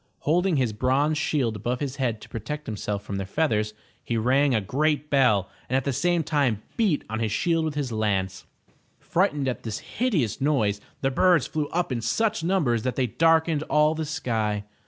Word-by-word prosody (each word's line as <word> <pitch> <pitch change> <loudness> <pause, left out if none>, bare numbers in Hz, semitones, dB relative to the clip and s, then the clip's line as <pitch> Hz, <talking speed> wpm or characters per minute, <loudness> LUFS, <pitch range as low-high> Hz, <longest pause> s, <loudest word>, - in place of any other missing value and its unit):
Holding 175 +3 +2
his 125 -6 +1
bronze 135 +7 +1
shield 135 -7 0
above 120 +4 -2
his 140 -2 -4
head 120 -5 -1
to - - -12
protect 145 +7 -5
himself 105 -1 -4
from 100 -1 -4
their 95 -1 -4
feathers, 105 -5 0 0.3
he 115 - -2
rang 130 +4 +3
a - - +3
great 150 +7 0
bell 110 -9 +3 0.2
and 130 - 0
at 135 - 0
the 140 - -1
same 175 +4 +1
time 140 -9 0
beat 200 -10 +1
on 110 +1 -3
his 110 -2 -1
shield 165 +1 +1
with 155 -2 -3
his 140 -4 -2
lance. 95 -4 -1 0.5
Frightened 150 -7 0
at 125 - -2
this 110 -2 -4
hideous 175 - -1
noise 110 -9 +1 0.2
the 135 - +1
birds 175 +1 +4
flew 155 -2 -2
up 175 -2 -1
in 120 -2 -1
such 210 - 0
numbers 160 - +1
that 130 +2 -2
they 130 - +1
darkened 160 +4 +2
all 150 +1 +4
the 160 0 -3
sky. 110 -9 -1
135 Hz, 195 wpm, -25 LUFS, 110-155 Hz, 0.5 s, birds